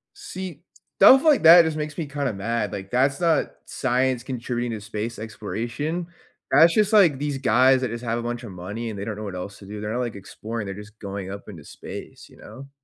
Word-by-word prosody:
See, 190 Hz, -, -8 dB, 0.4 s
stuff 265 Hz, +1 st, +8 dB
like 305 Hz, -, +4 dB
that 170 Hz, +1 st, +10 dB
just 160 Hz, -1 st, -2 dB
makes 150 Hz, -1 st, -4 dB
me 165 Hz, -4 st, -3 dB
kinda 140 Hz, -3 st, -2 dB
mad, 105 Hz, +1 st, -2 dB
like, 95 Hz, -1 st, -6 dB
that's 135 Hz, +4 st, +1 dB
not 165 Hz, -3 st, +2 dB
science 130 Hz, -1 st, 0 dB
contributing 120 Hz, -1 st, -3 dB
to -, -, -8 dB
space 110 Hz, +1 st, -5 dB
exploration, 115 Hz, -, -4 dB, 0.4 s
that's 165 Hz, +2 st, +6 dB
just, 215 Hz, 0 st, +2 dB
like, 175 Hz, -10 st, +5 dB
these 145 Hz, -1 st, -2 dB
guys 130 Hz, +1 st, +4 dB
that 130 Hz, -3 st, -2 dB
just 115 Hz, +1 st, -6 dB
have 115 Hz, 0 st, -1 dB
a -, -, -4 dB
bunch 120 Hz, +1 st, -4 dB
of 115 Hz, -, -8 dB
money 105 Hz, +6 st, -6 dB
and 100 Hz, -, -7 dB
they 100 Hz, -, -4 dB
don't 105 Hz, -1 st, -5 dB
know 105 Hz, -, -7 dB
what 100 Hz, -3 st, -6 dB
else 95 Hz, +2 st, -7 dB
to 100 Hz, -, -13 dB
do, 105 Hz, +1 st, -7 dB
they're 105 Hz, +1 st, -4 dB
not, 125 Hz, -, -1 dB
like, 120 Hz, -4 st, -3 dB
exploring, 110 Hz, +3 st, -6 dB
they're 95 Hz, -, -5 dB
just 105 Hz, +2 st, -12 dB
going 100 Hz, -2 st, -6 dB
up 100 Hz, +2 st, -9 dB
into 85 Hz, -8 st, -10 dB
space, -, -, -10 dB
you -, -, -19 dB
know? 135 Hz, +1 st, -12 dB
120 Hz, 230 wpm, -24 LUFS, 105-145 Hz, 0.4 s, that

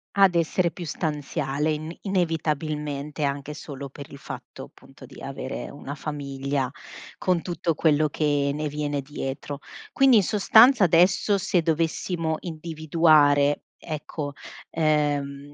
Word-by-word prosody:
Ad 195 Hz, -2 st, +6 dB
essere 170 Hz, +1 st, +1 dB
più 180 Hz, -, -8 dB
stanziale 150 Hz, -1 st, -2 dB
in 155 Hz, +2 st, -4 dB
inevitabilmente, 155 Hz, -5 st, -2 dB
anche 140 Hz, +1 st, -2 dB
solo 140 Hz, -2 st, -8 dB
per 140 Hz, +1 st, -10 dB
il 140 Hz, -, -9 dB
fatto, -, -, -9 dB
appunto, -, -, -15 dB
di -, -, -14 dB
avere -, -, -5 dB
una 140 Hz, -, -7 dB
famiglia 140 Hz, -3 st, -3 dB, 0.5 s
con 180 Hz, -3 st, +1 dB
tutto 170 Hz, -2 st, -2 dB
quello 155 Hz, -1 st, +3 dB
che 145 Hz, -2 st, +1 dB
ne 150 Hz, +1 st, -2 dB
viene 145 Hz, -1 st, -2 dB
dietro. 140 Hz, 0 st, -5 dB, 0.3 s
Quindi, 270 Hz, -3 st, +5 dB
in 200 Hz, -, +4 dB
sostanza, 220 Hz, +3 st, +6 dB
adesso 180 Hz, +4 st, +4 dB
se 180 Hz, -2 st, +1 dB
dovessimo 160 Hz, 0 st, -1 dB
individuare, 155 Hz, -3 st, +2 dB
ecco, 150 Hz, -2 st, -5 dB, 0.4 s
ehm 145 Hz, -2 st, 0 dB
150 Hz, 125 wpm, -25 LUFS, 145-170 Hz, 0.5 s, Ad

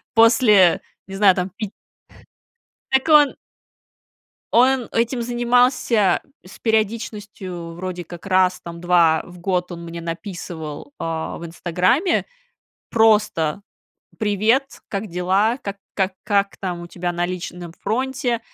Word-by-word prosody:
после, 225 Hz, -5 st, +6 dB, 0.3 s
не 195 Hz, -, -7 dB
знаю, 195 Hz, -2 st, +5 dB
там 180 Hz, 0 st, -2 dB
пит 215 Hz, -3 st, -5 dB, 1.2 s
Так 265 Hz, +4 st, +2 dB
он 295 Hz, -2 st, +6 dB, 1.2 s
Он 255 Hz, 0 st, +4 dB
этим 235 Hz, +1 st, 0 dB
занимался 240 Hz, -3 st, +2 dB, 0.3 s
с 185 Hz, -, -13 dB
периодичностью, 205 Hz, -6 st, -2 dB
вроде 180 Hz, 0 st, -5 dB
как, 175 Hz, +3 st, -11 dB
раз, 185 Hz, -1 st, +3 dB
там, 170 Hz, 0 st, -9 dB
два 170 Hz, -3 st, +4 dB
раза 180 Hz, -, -14 dB
в 180 Hz, -, -13 dB
год 180 Hz, 0 st, -1 dB
он 170 Hz, -, -7 dB
мне 170 Hz, 0 st, -7 dB
написывал, 165 Hz, -, -6 dB
а, 165 Hz, -1 st, -3 dB
в 170 Hz, -, -7 dB
"Инстаграме" 180 Hz, -, +1 dB, 0.6 s
просто: 210 Hz, -6 st, +2 dB, 0.6 s
"Привет, 220 Hz, +6 st, +1 dB
как 200 Hz, 0 st, -3 dB
дела? 190 Hz, +7 st, +1 dB
Как 200 Hz, -7 st, -6 dB, 0.2 s
как 190 Hz, -1 st, -1 dB
как 200 Hz, -2 st, +1 dB
там 180 Hz, -3 st, -4 dB
у 175 Hz, -, -8 dB
тебя 175 Hz, 0 st, -3 dB
на 175 Hz, 0 st, -1 dB
личном 175 Hz, -1 st, -6 dB
фронте?" 250 Hz, +2 st, -1 dB
195 Hz, 125 wpm, -21 LUFS, 175-230 Hz, 1.2 s, после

